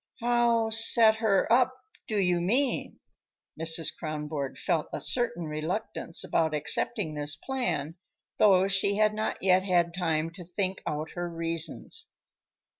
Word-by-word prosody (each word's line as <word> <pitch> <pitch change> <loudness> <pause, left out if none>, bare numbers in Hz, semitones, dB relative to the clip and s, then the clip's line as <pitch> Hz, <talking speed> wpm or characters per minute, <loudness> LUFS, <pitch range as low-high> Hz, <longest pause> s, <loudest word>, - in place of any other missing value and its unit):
"How 235 -2 +2
set 225 0 +5
her 215 -4 +2
up, 255 +1 +3 0.3
do 215 - -2
you 180 -3 +1
mean?" 245 +9 0 0.6
Mrs. 160 -1 0
Kronborg 150 -3 -5
felt 165 -5 -1
a - - -4
certain 205 -10 -1
reluctance 165 +3 -2
about 160 -2 0
accepting 155 +4 -1
this 145 0 -4
plan, 165 - -3 0.4
though 190 -3 +5
she 195 +1 +2
had 215 0 +2
not 215 -2 -3
yet 185 -1 +4
had 175 -3 +1
time 165 -2 -1
to 180 +2 -10
think 185 +2 -3
out 155 +1 -3
her 175 0 -4
reasons. 165 -1 0
180 Hz, 135 wpm, -28 LUFS, 160-215 Hz, 0.6 s, set